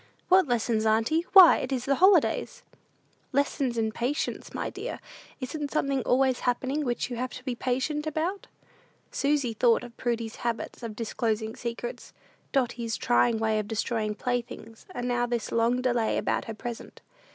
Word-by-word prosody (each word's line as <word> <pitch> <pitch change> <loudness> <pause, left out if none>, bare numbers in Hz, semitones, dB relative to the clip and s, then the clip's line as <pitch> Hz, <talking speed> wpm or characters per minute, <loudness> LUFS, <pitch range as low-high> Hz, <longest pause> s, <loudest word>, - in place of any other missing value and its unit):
"What 370 -2 +6
lessons, 230 -2 +1
auntie? 225 +11 +2
Why, 375 -4 +10
it 255 - -4
is 255 -3 -1
the 275 - +2
holidays!" 395 - +3 0.7
"Lessons 275 -3 0
in 220 -1 0
patience, 255 +8 -3
my - - -4
dear. - - -6 0.4
Isn't 290 +3 -4
something 275 -3 0
always 260 +1 +2
happening 260 +4 -1
which 245 -1 -2
you 240 - -3
have 255 +1 -3
to 255 - -9
be 255 -2 -2
patient 265 +5 -2
about?" 330 +6 -2 0.6
Susy 275 -4 0
thought 230 +2 +3
of 240 -1 -11
Prudy's 230 -2 -2
habit 235 +1 -4
of 230 -3 -6
disclosing 220 0 -2
secrets, 250 - -6 0.4
Dotty's 235 -3 -1
trying 240 -1 +2
way 220 -1 +1
of 210 - -4
destroying 220 -1 -1
playthings; 235 -2 -4
and 245 -9 -4
now 245 0 +1
this 240 -2 -2
long 235 +2 +1
delay 240 -3 +1
about - - -1
her 225 - -6
present. 235 +1 -8
245 Hz, 160 wpm, -27 LUFS, 230-275 Hz, 0.7 s, Why